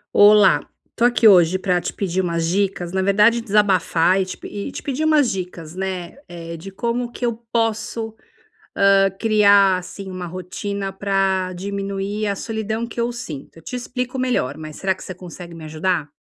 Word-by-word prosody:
Olá, 205 Hz, -1 st, +7 dB, 0.3 s
tô 235 Hz, -, +2 dB
aqui 240 Hz, -2 st, +5 dB
hoje 180 Hz, -3 st, +6 dB
pra 180 Hz, -2 st, 0 dB
te -, -, -3 dB
pedir 190 Hz, -2 st, -1 dB
umas 170 Hz, -2 st, -1 dB
dicas, 185 Hz, -1 st, -1 dB
na 190 Hz, +1 st, 0 dB
verdade 210 Hz, +5 st, +4 dB
desabafar 195 Hz, -4 st, +2 dB
e -, -, 0 dB
te 185 Hz, -, -6 dB
pe -, -, -9 dB
e 205 Hz, +6 st, -5 dB
te -, -, -7 dB
pedir 280 Hz, +2 st, -2 dB
umas 300 Hz, -5 st, +4 dB
dicas, 180 Hz, -4 st, -6 dB
né. 185 Hz, +1 st, -4 dB
Eh, 170 Hz, -1 st, -7 dB
de 170 Hz, +4 st, -9 dB
como 235 Hz, +4 st, -2 dB
que 245 Hz, -, -4 dB
eu 235 Hz, -1 st, 0 dB, 0.2 s
posso, 225 Hz, 0 st, -1 dB, 0.6 s
hã, 195 Hz, 0 st, +4 dB
criar 200 Hz, -3 st, +5 dB
assim 190 Hz, +2 st, -9 dB
uma 185 Hz, -1 st, -5 dB
rotina 195 Hz, +3 st, -5 dB
pra 195 Hz, -1 st, 0 dB
diminuir 200 Hz, +2 st, -3 dB
a 200 Hz, -, 0 dB
solidão 220 Hz, +1 st, -3 dB
que 235 Hz, -, -8 dB
eu 235 Hz, +1 st, 0 dB
sinto. 165 Hz, -, -8 dB
Eu -, -, -13 dB
te 250 Hz, -, -7 dB
explico 250 Hz, +1 st, -4 dB
melhor, 250 Hz, -, 0 dB
mas 155 Hz, -1 st, -8 dB
será 190 Hz, -1 st, 0 dB
que -, -, -12 dB
você 185 Hz, -, -7 dB
consegue 175 Hz, -1 st, -10 dB
me 165 Hz, -1 st, -9 dB
ajudar? 155 Hz, 0 st, -1 dB
195 Hz, 185 wpm, -21 LUFS, 180-220 Hz, 0.6 s, Olá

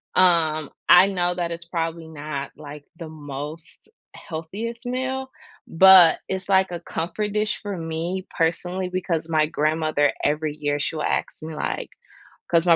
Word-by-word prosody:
Um, 160 Hz, -4 st, +3 dB, 0.2 s
I 180 Hz, +2 st, +9 dB
know 180 Hz, -2 st, 0 dB
that 170 Hz, -1 st, -2 dB
it's 170 Hz, 0 st, -6 dB
probably 165 Hz, -1 st, -3 dB
not, 150 Hz, -2 st, -6 dB
like, 150 Hz, -1 st, -10 dB
the 165 Hz, -, -7 dB
most 150 Hz, -, -8 dB, 0.3 s
healthiest 210 Hz, +10 st, -6 dB
meal, 260 Hz, +1 st, -2 dB, 0.4 s
but 185 Hz, -1 st, +8 dB
it's, 190 Hz, +1 st, -4 dB
like, 190 Hz, -1 st, +3 dB
a 175 Hz, -, -4 dB
comfort 200 Hz, +6 st, -3 dB
dish 210 Hz, 0 st, 0 dB
for 205 Hz, -3 st, -4 dB
me 165 Hz, +3 st, -3 dB
personally, 180 Hz, +2 st, -1 dB
because 170 Hz, -3 st, -2 dB
my 155 Hz, -1 st, +3 dB
grandmother, 155 Hz, -1 st, +1 dB
every 150 Hz, 0 st, 0 dB
year 145 Hz, 0 st, -1 dB
she 160 Hz, -, -2 dB
will 155 Hz, -, -3 dB
ask -, -, -2 dB
me, 160 Hz, -1 st, -6 dB
like -, -, -3 dB, 0.6 s
'cause 170 Hz, +1 st, +3 dB
my 170 Hz, -, +7 dB
165 Hz, 155 wpm, -23 LUFS, 155-185 Hz, 0.6 s, I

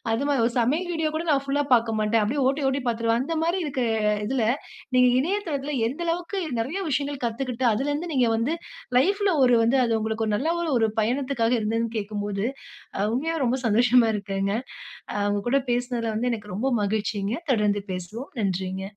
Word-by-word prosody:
அது 230 Hz, +5 st, 0 dB
மாரி 280 Hz, -3 st, +2 dB
ஒரு 240 Hz, -, -1 dB
சமையல் 305 Hz, +10 st, +1 dB
வீடியோ 320 Hz, -1 st, 0 dB
கூட 315 Hz, -, -1 dB
நான் 275 Hz, -2 st, +3 dB
புல்லா 285 Hz, +1 st, +1 dB
பார்க்கமாட்டேன். 225 Hz, -1 st, +2 dB
அப்டியே 265 Hz, +7 st, 0 dB
ஓட்டி 280 Hz, +2 st, -1 dB
ஓட்டி 270 Hz, +1 st, 0 dB
பார்த்துடுவேன். 230 Hz, 0 st, +1 dB
அந்த 330 Hz, +4 st, -3 dB
மாரி 340 Hz, +3 st, +1 dB
இருக்கிற 270 Hz, -4 st, -1 dB, 0.4 s
இதுல 250 Hz, -1 st, 0 dB, 0.5 s
நீங்க 250 Hz, 0 st, +6 dB
இணையதளத்தில 295 Hz, -4 st, -1 dB
எந்த 275 Hz, +7 st, -7 dB
அளவுக்கு 350 Hz, +4 st, -2 dB, 0.2 s
நெறைய 285 Hz, +12 st, -2 dB
விஷயங்கள் 280 Hz, -1 st, -2 dB
கத்துக்கிட்டு 250 Hz, +2 st, -3 dB
அதுலருந்து, 290 Hz, +8 st, -2 dB
நீங்க 255 Hz, -3 st, +3 dB
வந்து 250 Hz, +9 st, 0 dB, 0.4 s
லைஃப்ல 395 Hz, +6 st, +2 dB
ஒரு 245 Hz, -1 st, +5 dB
வந்து 235 Hz, +4 st, +3 dB
அது 230 Hz, -, 0 dB
உங்களுக்கு 220 Hz, 0 st, -1 dB
ஒரு 210 Hz, -, 0 dB
நல்ல 300 Hz, +8 st, -1 dB
ஒரு 335 Hz, -3 st, -1 dB
ஒரு 225 Hz, -1 st, +3 dB
பயணத்துக்காக 245 Hz, 0 st, +1 dB
இருந்ததுனு 225 Hz, +2 st, -1 dB
கேக்கும்போது, 205 Hz, 0 st, -3 dB, 0.7 s
உண்மையா 325 Hz, +6 st, -1 dB
ரொம்ப 250 Hz, +2 st, +1 dB
சந்தோஷமா 235 Hz, +2 st, +4 dB
இருக்குங்க. 195 Hz, -1 st, -2 dB, 0.6 s
அ, -, -, -6 dB, 0.2 s
உங்க 205 Hz, -, 0 dB
கூட 275 Hz, +2 st, +4 dB
பேசினதில 240 Hz, -2 st, -1 dB
வந்து 245 Hz, +3 st, 0 dB
எனக்கு 210 Hz, -3 st, -6 dB
ரொம்ப 250 Hz, +6 st, -1 dB, 0.2 s
மகிழ்ச்சிங்க 205 Hz, 0 st, -1 dB, 0.2 s
தொடர்ந்து 210 Hz, -3 st, +2 dB
பேசுவோம். 185 Hz, +7 st, -5 dB, 0.2 s
நன்றிங்க. 190 Hz, -1 st, -2 dB
240 Hz, 170 wpm, -25 LUFS, 220-280 Hz, 0.7 s, நீங்க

